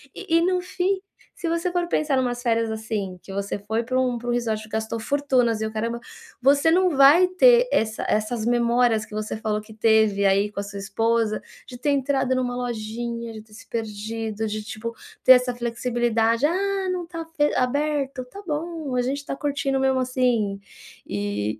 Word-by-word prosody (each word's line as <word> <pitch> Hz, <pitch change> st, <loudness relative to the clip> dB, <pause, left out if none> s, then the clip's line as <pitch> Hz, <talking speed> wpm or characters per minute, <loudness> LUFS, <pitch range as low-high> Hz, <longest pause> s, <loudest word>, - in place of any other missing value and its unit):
E 365 Hz, -4 st, -1 dB
e -, -, +3 dB
no 365 Hz, +1 st, +1 dB
fim, 375 Hz, +2 st, -1 dB, 0.3 s
se 335 Hz, -, -3 dB
você 335 Hz, +2 st, 0 dB
for 350 Hz, -1 st, 0 dB
pensar 300 Hz, -5 st, +1 dB
numas 245 Hz, -2 st, 0 dB
férias, 230 Hz, -1 st, +1 dB
assim, 220 Hz, -4 st, -4 dB
que 195 Hz, -, -9 dB
você 200 Hz, +1 st, -2 dB
foi 220 Hz, +3 st, -2 dB
para 255 Hz, +2 st, 0 dB
um 255 Hz, -1 st, +1 dB
para 240 Hz, -, -9 dB
um 240 Hz, -, +1 dB
resort 220 Hz, -3 st, -2 dB
gastou 220 Hz, +1 st, -3 dB
fortunas 255 Hz, -3 st, +1 dB
e 220 Hz, -, -1 dB
o 220 Hz, -, -5 dB
caramba, 230 Hz, +2 st, -2 dB, 0.4 s
você 280 Hz, +4 st, +4 dB
não 360 Hz, -1 st, +3 dB
vai 280 Hz, +7 st, +7 dB
ter 485 Hz, +6 st, +5 dB
essa 220 Hz, 0 st, 0 dB
essas 215 Hz, +1 st, 0 dB
memórias 235 Hz, -2 st, +2 dB
que -, -, -15 dB
você 215 Hz, 0 st, -3 dB
falou 215 Hz, -1 st, -2 dB
que 215 Hz, +1 st, -13 dB
teve 220 Hz, -2 st, +3 dB
aí 200 Hz, +1 st, +3 dB
com 205 Hz, -, -5 dB
a -, -, -2 dB
sua 200 Hz, 0 st, -8 dB
esposa, 215 Hz, +2 st, 0 dB, 0.3 s
de 245 Hz, -2 st, -10 dB
ter 290 Hz, -, 0 dB
entrado 270 Hz, -1 st, +1 dB
numa 245 Hz, -1 st, -1 dB
lojinha, 235 Hz, -1 st, -4 dB
de 215 Hz, -, -8 dB
ter 215 Hz, 0 st, -20 dB
se -, -, -14 dB
perdido, 220 Hz, 0 st, -4 dB
de, 215 Hz, 0 st, -3 dB
tipo, 225 Hz, +2 st, -6 dB, 0.3 s
ter 260 Hz, -, +7 dB
essa 250 Hz, -1 st, +5 dB
flexibilidade: 235 Hz, 0 st, 0 dB
"Ah, 385 Hz, +3 st, 0 dB
não 355 Hz, -2 st, -3 dB
está 330 Hz, -1 st, -7 dB
fe 315 Hz, -2 st, 0 dB
aberto. 275 Hz, 0 st, 0 dB
Tá 400 Hz, +11 st, -11 dB
bom, 310 Hz, -3 st, -3 dB
a 250 Hz, -, +2 dB
gente 265 Hz, +3 st, -1 dB
está 280 Hz, -1 st, -5 dB
curtindo 280 Hz, -1 st, -1 dB
mesmo 265 Hz, -1 st, +2 dB
assim." 245 Hz, -6 st, 0 dB, 0.5 s
E 105 Hz, +1 st, -2 dB
240 Hz, 190 wpm, -24 LUFS, 220-280 Hz, 0.5 s, vai